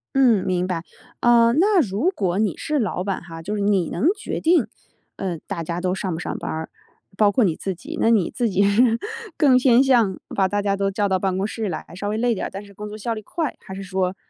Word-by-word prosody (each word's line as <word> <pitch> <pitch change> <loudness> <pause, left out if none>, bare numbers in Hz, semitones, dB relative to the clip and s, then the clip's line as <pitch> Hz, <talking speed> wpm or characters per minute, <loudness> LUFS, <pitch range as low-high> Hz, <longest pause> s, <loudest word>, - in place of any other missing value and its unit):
嗯， 240 -8 +4
明 180 -1 0
白。 175 -3 -2 0.4
呃， 235 -1 +5
那 370 - +4
如 230 - +1
果 190 - -1
你 210 -6 0
是 305 -1 -1
老 185 -3 -2
板 195 -2 -2
哈， 165 -2 -9
就 205 +5 -3
是 205 - -2
你 200 -4 +2
能 240 - +1
决 - - -4
定， 320 -8 +3 0.5
呃， 180 -4 -3
大 180 -5 -4
家 170 +2 -4
都 185 0 0
上 190 -2 -3
不 160 - -3
上 - - -4
班 - - -5
儿， 160 0 -4 0.5
包 210 -1 +4
括 235 +3 +2
你 170 -5 +2
自 190 +1 -4
己， 180 - -8
那 225 - +4
你 205 -7 +3
自 240 -2 -1
己 195 +1 +2
是 225 +3 +3 0.4
更 270 -4 +5
偏 255 0 +5
向 235 -8 +3 0.2
把 190 -1 +2
大 205 +1 0
家 200 -1 +1
都 195 0 0
叫 205 +1 0
到 190 -1 +1
办 190 -1 0
公 195 - 0
室 220 -1 -3
来， 170 - -5
稍 205 +3 -4
微 210 - -1
累 240 +1 +1
点 195 - -3
儿， - - -6
但 195 +2 -7
是 200 -1 -16
工 210 +2 -7
作 215 +1 -8
效 230 +2 -2
率 215 - -7
快， 310 - -3
还 - - -11
是 195 +1 -6
说， 185 0 -1
200 Hz, 275 characters per minute, -22 LUFS, 185-235 Hz, 0.5 s, 呃